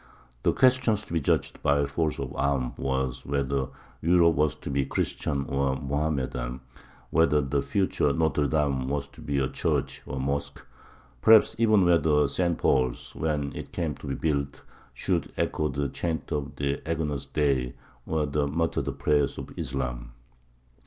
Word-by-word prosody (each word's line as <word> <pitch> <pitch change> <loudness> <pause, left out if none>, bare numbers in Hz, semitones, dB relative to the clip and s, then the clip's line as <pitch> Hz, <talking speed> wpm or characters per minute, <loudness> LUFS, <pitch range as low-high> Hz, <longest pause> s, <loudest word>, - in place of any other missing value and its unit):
The - - +3
question 130 -3 +4
to 100 - -7
be 85 - +2
judged - - 0
by 70 0 +3
force 75 +2 -1
of - - -5
arms 70 -3 0
was 65 -1 -1
whether 70 -1 -1 0.3
Europe 85 0 +5
was 75 -2 +1
to - - -7
be 70 0 +1
Christian 70 +1 -2
or 70 -2 0
Mohammedan 65 -3 -2 0.5
whether 75 -2 +4
the 70 0 0
future 95 -6 +1
Nôtre 75 -1 +1
Dame 70 -4 +1
was 70 0 -2
to - - -15
be 70 -1 -2
a 65 -1 +2
church - - -1
or - - -4
a - - -3
mosque 70 +2 -3 0.6
perhaps 110 +4 +6
even 110 -4 +5
whether 75 -4 +4
St. 85 +3 0
Paul's, 65 -2 +1
when 75 -3 -1
it - - -7
came 80 -4 -1
to 70 - -10
be 70 - -2
built, 70 -3 -2 0.3
should - - -1
echo 75 - 0
the 70 0 -1
chant 80 +5 -3
of 75 -2 -3
the 70 0 -1
Agnus 75 -4 -2
Dei 65 -5 0 0.3
or 80 -1 0
the 70 0 0
muttered 80 +3 -1
prayers 75 -2 +1
of - - -6
Islam. 60 -2 -4
70 Hz, 160 wpm, -27 LUFS, 70-80 Hz, 0.6 s, perhaps